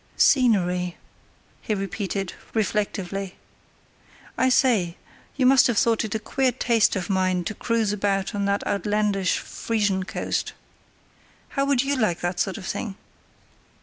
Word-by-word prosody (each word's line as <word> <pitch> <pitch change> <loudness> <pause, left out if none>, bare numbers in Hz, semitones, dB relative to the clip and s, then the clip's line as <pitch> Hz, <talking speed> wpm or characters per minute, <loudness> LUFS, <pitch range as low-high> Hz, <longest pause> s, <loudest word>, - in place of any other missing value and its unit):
"Scenery," 180 -9 +3 0.6
he 215 - -1
repeated, 195 -1 -3 0.2
reflectively. 195 -2 -2 1.0
"I 260 - +2
say, 220 -10 +2 0.4
you 265 - +1
must 265 0 +6
have 240 -4 0
thought 230 0 +3
it 220 -1 -4
a - - 0
queer 260 +3 0
taste 230 -3 +2
of 185 -3 -2
mine 185 -2 +1
to 215 - -3
cruise 225 -2 0
about 195 -1 -1
on 200 -1 -1
that 200 0 0
outlandish 205 -2 0
Frisian 205 -4 -1
coast. - - -3 1.0
How 275 -1 0
would 275 -3 +3
you 280 +1 0
like 215 -9 +1
that 175 0 -2
sort 190 +2 0
of 195 - -8
thing?" 205 -1 -4
205 Hz, 140 wpm, -24 LUFS, 190-230 Hz, 1.0 s, must